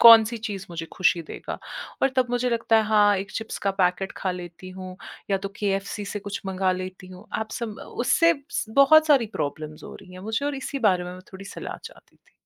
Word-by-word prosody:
कौन-सी 230 Hz, 0 st, +9 dB
चीज़ 205 Hz, -3 st, -5 dB
मुझे 165 Hz, -1 st, -5 dB
खुशी 180 Hz, -2 st, +3 dB
देगा? 155 Hz, -, -7 dB, 0.4 s
और 270 Hz, -, +6 dB
तब 255 Hz, -1 st, +4 dB
मुझे 245 Hz, 0 st, +1 dB
लगता 230 Hz, -1 st, +3 dB
है, 220 Hz, -, +5 dB
हाँ, 210 Hz, -1 st, +5 dB
1 195 Hz, +2 st, -4 dB
चिप्स 225 Hz, 0 st, -4 dB
का 195 Hz, -, +5 dB
पैकेट 180 Hz, +2 st, +2 dB
खा 190 Hz, -, -1 dB
लेती 180 Hz, 0 st, -7 dB
हूँ, 185 Hz, 0 st, -8 dB, 0.3 s
या 195 Hz, -, +4 dB
तो 195 Hz, +1 st, -4 dB
केएफसी 200 Hz, 0 st, -1 dB
से 205 Hz, +1 st, -4 dB
कुछ 205 Hz, +1 st, -5 dB
मँगा 190 Hz, 0 st, +1 dB
लेती 185 Hz, 0 st, -6 dB
हूँ। 185 Hz, +2 st, -12 dB
आप 220 Hz, -, -4 dB
सम 235 Hz, -3 st, -3 dB, 0.3 s
उससे 335 Hz, +6 st, +5 dB, 0.2 s
स -, -, -1 dB
बहुत 315 Hz, +3 st, +8 dB
सारी 275 Hz, -7 st, +5 dB
प्रॉब्लम्स 150 Hz, +1 st, -4 dB
हो -, -, -9 dB
रही 185 Hz, -2 st, -13 dB
हैं 185 Hz, -, -9 dB
मुझे 220 Hz, +6 st, -2 dB
और 290 Hz, -, -1 dB
इसी 275 Hz, +1 st, -4 dB
बारे 180 Hz, -2 st, +2 dB
में 180 Hz, -, -6 dB
मैं 185 Hz, -, -9 dB
थोड़ी 190 Hz, +1 st, -9 dB
सलाह 195 Hz, -, -6 dB
चाहती -, -, -13 dB
थी। -, -, -32 dB
195 Hz, 220 wpm, -25 LUFS, 185-225 Hz, 0.4 s, कौन-सी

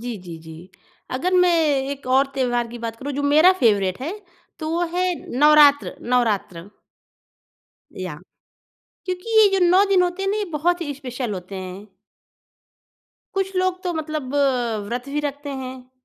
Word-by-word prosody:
जी, 240 Hz, -1 st, -5 dB
जी, 175 Hz, -3 st, -9 dB
जी। 160 Hz, +3 st, -12 dB, 0.4 s
अगर 355 Hz, +9 st, -1 dB
मैं 360 Hz, -1 st, +5 dB, 0.4 s
एक 280 Hz, -2 st, -7 dB
और 275 Hz, +1 st, +4 dB
त्योहार 245 Hz, -3 st, 0 dB
की 240 Hz, +1 st, -9 dB
बात 230 Hz, -1 st, -5 dB
करूँ, 280 Hz, +4 st, -5 dB
जो 285 Hz, -, -3 dB
मेरा 310 Hz, +6 st, +6 dB
फ़ेवरेट 200 Hz, -5 st, +2 dB
है, 310 Hz, +8 st, -3 dB, 0.5 s
तो 310 Hz, -, -4 dB
वो 340 Hz, +1 st, 0 dB
है, 365 Hz, -1 st, +1 dB, 0.2 s
नवरात्र, 295 Hz, -1 st, +5 dB
नवरात्र। 210 Hz, -7 st, -1 dB, 1.3 s
याह। -, -, -6 dB, 0.9 s
क्योंकि 375 Hz, +5 st, -1 dB
ये 420 Hz, -, +7 dB
जो 365 Hz, -, +3 dB
9 375 Hz, +3 st, +5 dB
दिन 375 Hz, -2 st, +4 dB
होते 355 Hz, +2 st, -2 dB
हैं 390 Hz, -, 0 dB
ना, 415 Hz, -, 0 dB
ये 425 Hz, -, -1 dB
बहुत 350 Hz, +4 st, 0 dB
ही 290 Hz, -4 st, -3 dB
स्पेशल 250 Hz, -4 st, -5 dB
होते 185 Hz, +2 st, -8 dB
हैं। 185 Hz, +2 st, -7 dB, 1.5 s
कुछ 385 Hz, 0 st, -2 dB
लोग 370 Hz, 0 st, 0 dB
तो 355 Hz, -1 st, -2 dB
मतलब 305 Hz, -4 st, -4 dB
अ, 250 Hz, -6 st, +1 dB
व्रत 245 Hz, +3 st, -4 dB
भी 295 Hz, +2 st, -2 dB
रखते 285 Hz, 0 st, -5 dB
हैं। 255 Hz, 0 st, -9 dB
280 Hz, 165 wpm, -22 LUFS, 235-350 Hz, 1.5 s, ये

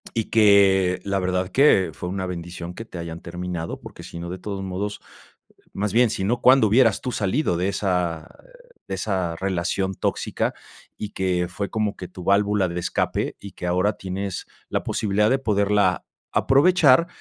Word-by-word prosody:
Y 115 Hz, -2 st, -2 dB
que, 100 Hz, -4 st, +5 dB
la 100 Hz, -1 st, -1 dB
verdad 90 Hz, 0 st, -1 dB
que 135 Hz, -9 st, +4 dB
fue 90 Hz, -, -6 dB
una 95 Hz, 0 st, -3 dB
bendición 85 Hz, -1 st, -6 dB
que 115 Hz, -, -7 dB
te 110 Hz, -5 st, -10 dB
hayan 85 Hz, -1 st, -6 dB
terminado, 85 Hz, -1 st, -5 dB
porque -, -, -11 dB
si -, -, -9 dB
no, 85 Hz, +1 st, -6 dB
de 95 Hz, -, -6 dB
todos 100 Hz, 0 st, -5 dB
modos, 95 Hz, +2 st, -4 dB, 0.7 s
más 100 Hz, 0 st, -2 dB
bien, 120 Hz, 0 st, +4 dB
sino, 105 Hz, +3 st, -1 dB
¿cuándo 130 Hz, -2 st, +6 dB
hubieras 115 Hz, -1 st, +4 dB
tú 125 Hz, -, -4 dB
salido 105 Hz, -, 0 dB
de 90 Hz, +3 st, 0 dB
esa, 90 Hz, -5 st, -1 dB, 0.2 s
eh, -, -, -20 dB
de -, -, -3 dB
esa 95 Hz, -3 st, -2 dB
relación 95 Hz, +1 st, -1 dB
tóxica? -, -, -2 dB, 0.4 s
Y 105 Hz, -, -5 dB
que 90 Hz, -3 st, 0 dB
fue 100 Hz, +3 st, -4 dB
como 110 Hz, -2 st, -1 dB
que 90 Hz, -, -8 dB
tu 90 Hz, 0 st, -10 dB
válvula 100 Hz, 0 st, +2 dB
de 85 Hz, +1 st, -3 dB
escape 85 Hz, -, -1 dB
y 100 Hz, -, -9 dB
que 90 Hz, -, -6 dB
ahora 90 Hz, +4 st, +2 dB
tienes 95 Hz, 0 st, -5 dB, 0.2 s
la -, -, -1 dB
posibilidad 105 Hz, +1 st, +1 dB
de 135 Hz, -, +3 dB
poderla 100 Hz, -5 st, +2 dB, 0.4 s
aprovechar, 150 Hz, +1 st, +5 dB
95 Hz, 175 wpm, -23 LUFS, 90-105 Hz, 0.7 s, cuándo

